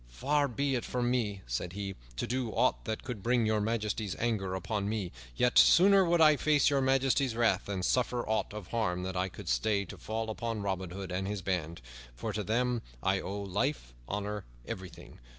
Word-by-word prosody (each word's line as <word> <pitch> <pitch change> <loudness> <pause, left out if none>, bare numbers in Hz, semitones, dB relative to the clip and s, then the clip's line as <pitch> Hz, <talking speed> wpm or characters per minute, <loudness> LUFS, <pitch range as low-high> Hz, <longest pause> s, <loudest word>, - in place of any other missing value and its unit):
"Far 140 - +1
be 140 +2 -1
it 125 - 0
from 120 -1 -1
me," 105 -6 -1
said - - -3
he, 100 0 -4 0.2
"to - - -2
do 125 -1 -1
aught 125 +3 +1
that 110 -1 -3
could 125 -6 -5
bring 120 +1 +2
Your 110 -1 +2
Majesty's 105 -2 -1
anger 105 -6 -1
upon 100 +1 -2
me. 105 -5 -2 0.2
Yet, 125 - +4
sooner 195 +2 +7
would 170 -1 +2
I 155 -2 +7
face 150 -1 +3
Your 140 -1 +2
Majesty's 135 -1 +2
wrath 115 -1 +2
than 95 -2 -3
suffer 125 +2 +1
aught 110 0 0
of 105 -4 -8
harm 90 -6 -1
that 95 0 -4
I 90 +1 0
could - - -11
stay 100 - +1
to 85 - -10
fall 110 0 -3
upon 115 -1 -3
Robin 95 -2 -2
Hood 95 +1 -6
and 95 +1 -2
his 100 -2 -3
band; 85 -6 -2 0.3
for 110 - -4
to 105 - -1
them 120 +3 0 0.2
I 95 0 +2
owe 100 +2 -4
life, 100 - -2
honor, 105 0 -3 0.2
everything. 95 -2 -8
110 Hz, 200 wpm, -31 LUFS, 95-125 Hz, 0.3 s, sooner